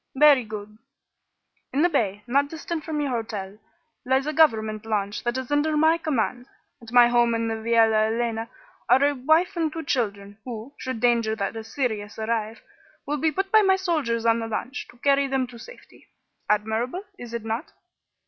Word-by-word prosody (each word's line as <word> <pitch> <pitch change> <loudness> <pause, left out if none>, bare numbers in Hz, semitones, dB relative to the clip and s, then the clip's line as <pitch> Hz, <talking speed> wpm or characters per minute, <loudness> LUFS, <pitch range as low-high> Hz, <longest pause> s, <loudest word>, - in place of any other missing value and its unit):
"Very 285 -2 +6
good. 215 0 -8 0.9
In 285 +4 +1
the - - +6
bay, 210 - -1
not 280 +4 +1
distant 320 0 -5
from 310 -2 -3
your 285 -2 -1
hotel, 210 -4 -4 0.4
lies 265 +2 +1
a 305 - -2
government 220 -9 +2
launch 210 -2 -2
that 240 +1 -1
is 260 +1 -5
under 300 +1 +2
my 320 +2 +4
command. 255 -5 -1 0.3
At 230 -1 -12
my 245 -1 +7
home 240 -1 +3
in 230 0 -1
the - - -1
Viala 225 -1 +3
Elena 230 0 -2 0.4
are 265 - +5
a 290 - +2
wife 315 +8 +2
and 325 -2 0
two 325 +1 -5
children, 205 -7 -2
who, 240 +2 -7
should 255 -4 -4
danger 235 -2 +2
that 200 0 -3
is 225 0 -7
serious 215 -7 -3
arise, 220 0 -2 0.5
will 295 +1 -1
be 315 +2 +1
put 385 +5 -2
by 435 - +7
my 385 -2 +4
soldiers 300 -12 -1
on 230 0 +3
the 225 - -4
launch, 240 +5 -4
to - - -17
carry 275 +2 +2
them 265 -1 0
to 240 -1 -12
safety. - - -15 0.4
Admirable, 220 - 0 0.2
is 240 -1 -8
it 230 -2 -5
not?" 225 +6 -3
240 Hz, 185 wpm, -24 LUFS, 220-290 Hz, 0.9 s, my